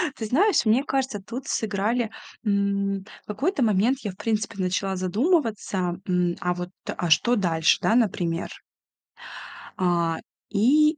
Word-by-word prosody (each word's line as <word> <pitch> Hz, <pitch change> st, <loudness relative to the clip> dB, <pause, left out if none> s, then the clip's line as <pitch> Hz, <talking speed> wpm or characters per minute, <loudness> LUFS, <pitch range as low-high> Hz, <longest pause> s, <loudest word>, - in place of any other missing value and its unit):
Ты 220 Hz, -, -5 dB
знаешь, 320 Hz, -, +3 dB
мне 230 Hz, +5 st, +4 dB
кажется, 265 Hz, -7 st, -1 dB
тут 250 Hz, +5 st, -6 dB
сыграли. 220 Hz, +2 st, 0 dB, 0.4 s
М, 200 Hz, -1 st, 0 dB, 0.2 s
в -, -, -38 dB
какой-то 275 Hz, -, 0 dB
момент 225 Hz, +5 st, +2 dB
я, 210 Hz, -7 st, -4 dB
в 185 Hz, -, -17 dB
принципе, 220 Hz, -1 st, -2 dB
начала 190 Hz, +1 st, -1 dB
задумываться: 200 Hz, -, 0 dB
м, 180 Hz, -1 st, +1 dB
а 180 Hz, -1 st, +1 dB
вот, 180 Hz, 0 st, -5 dB, 0.2 s
а 175 Hz, -, -3 dB
что 235 Hz, +10 st, +4 dB
дальше, 165 Hz, -6 st, +2 dB
да, 225 Hz, -, +3 dB
например. 175 Hz, -7 st, 0 dB, 1.3 s
А, 170 Hz, -3 st, +1 dB, 0.3 s
и 295 Hz, +9 st, +4 dB
205 Hz, 135 wpm, -25 LUFS, 180-245 Hz, 1.3 s, мне